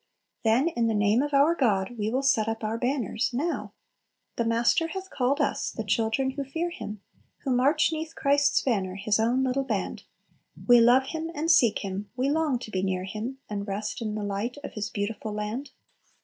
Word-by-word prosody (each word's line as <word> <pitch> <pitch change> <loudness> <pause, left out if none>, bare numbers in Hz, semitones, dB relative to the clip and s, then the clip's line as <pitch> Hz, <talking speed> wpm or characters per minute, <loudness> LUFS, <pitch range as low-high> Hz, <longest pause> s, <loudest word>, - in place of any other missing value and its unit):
Then, 235 +7 +3
"in 235 -8 0
the 225 - +1
name 210 +3 +3
of 290 +1 -2
our 285 +4 +5
God 225 - +1
we 215 -1 -1
will 260 +4 0
set 225 -5 +3
up 225 0 -3
our 215 +1 -1
banners" 245 -2 -1
now! 325 +7 -2 0.6
"The 235 - 0
Master 235 +8 +2
hath 380 +2 -7
called 265 +3 +1
us, 290 - 0
the 225 - -5
children 225 +6 +1
who 280 +1 -4
fear 325 +6 -3
Him, 210 - -7 0.4
Who 270 - -1
march 260 +6 +3
'neath 320 0 -4
Christ's 280 0 +2
banner, 195 -7 0
His 205 +2 0
own 240 +4 +2
little 265 +1 0
band; 220 -7 -3 0.6
We 245 -1 +8
love 245 +3 +6
Him, 320 0 -4
and 320 +3 +2
seek 230 -10 +4
Him; 195 +1 -5
we 265 +3 +1
long 305 -4 +1
to 220 - -8
be 185 - -1
near 185 -1 -1
Him, 220 +7 -5
And 205 -1 -4
rest 210 +3 -3
in 215 -2 -3
the 210 - -3
light 205 +6 -3
of - - -7
His 210 0 -3
beautiful 210 +1 -4
land." 215 +6 -4
235 Hz, 200 wpm, -27 LUFS, 210-275 Hz, 0.6 s, We